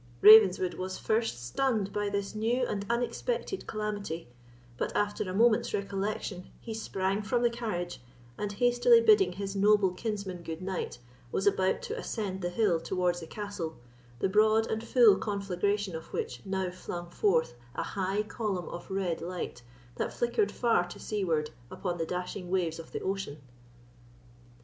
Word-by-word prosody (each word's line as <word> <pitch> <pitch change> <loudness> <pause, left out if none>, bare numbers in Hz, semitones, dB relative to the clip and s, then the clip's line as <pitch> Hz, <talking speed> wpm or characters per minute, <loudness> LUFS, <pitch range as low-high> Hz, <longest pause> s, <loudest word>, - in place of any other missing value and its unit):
Ravenswood 195 -4 +8
was 185 +1 -4
first 220 - -1
stunned 210 - 0
by 205 -1 0
this 200 0 -2
new 235 +4 +1
and 200 -3 -3
unexpected 310 - -2
calamity; 205 - -4 0.5
but - - -2
after 205 0 0
a - - -3
moment's 225 +1 +3
recollection 200 -1 -3
he 225 - -6
sprang 195 -2 -1
from 240 +3 0
the 240 - +4
carriage, 180 - -4 0.3
and 205 +7 -3
hastily 245 - +5
bidding 425 -4 +5
his 195 0 -4
noble 205 -1 +4
kinsman 195 -2 -4
goodnight, 180 +3 -4 0.3
was 195 - -1
about 190 -2 +2
to - - -4
ascend 195 -4 -3
the 175 - -1
hill 175 -3 +2
towards 175 +1 0
the 165 - -8
castle, 200 -5 -5 0.4
the 160 - +1
broad 215 +3 +4
and 220 0 -3
full 230 -4 +6
conflagration 200 -1 -1
of 160 0 -8
which 120 -1 -4
now 190 -1 -1
flung 175 -1 -6
forth 165 - +2 0.2
a - - -1
high 195 +2 -1
column 210 -5 -3
of 175 - -8
red 190 -4 -1
light, 175 -7 -5 0.4
that - - -1
flickered 240 - +1
far 230 -7 +2
to 175 - -9
seaward 165 -8 -1 0.2
upon 175 -2 -4
the 165 - -1
dashing 180 +1 -4
waves 175 -3 0
of 165 - -10
the - - -4
ocean. 190 -6 -3
195 Hz, 155 wpm, -30 LUFS, 180-215 Hz, 0.5 s, Ravenswood